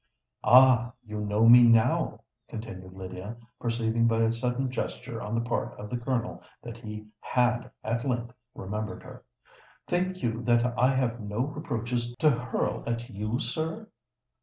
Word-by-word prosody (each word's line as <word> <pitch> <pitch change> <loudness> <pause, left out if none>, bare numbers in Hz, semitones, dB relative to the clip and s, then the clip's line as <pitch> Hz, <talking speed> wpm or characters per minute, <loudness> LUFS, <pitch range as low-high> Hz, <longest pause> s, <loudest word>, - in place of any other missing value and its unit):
"Ah! 125 -1 +6
you 105 -1 -5
know 105 +2 +2
me 120 +1 +10
now," 115 -2 +4 0.3
continued 95 -5 -8
Lydia, 95 +4 -7 0.2
perceiving 115 0 +1
by 115 0 +2
a 115 - +3
sudden 125 +2 -1
gesture 115 -1 -4
on 105 0 -3
the 115 +1 -1
part 120 - -2
of 105 0 -8
the 125 - -1
Colonel 125 -1 -2 0.2
that 120 -1 -8
he 105 -2 -8
had 125 +1 +1
at 115 +1 -1
length 120 -2 -2 0.2
remembered 105 +3 -5
her. - - -12 0.6
"Think 185 -1 -1
you 115 -1 -1
that 120 0 +3
I 125 - +4
have 125 -2 0
no 105 +2 -3
reproaches 120 -4 -3
to 155 +1 +5
hurl 125 0 -2
at 120 +1 -3
you, 105 +3 -2
sir? 160 - -3
120 Hz, 155 wpm, -28 LUFS, 110-125 Hz, 0.6 s, me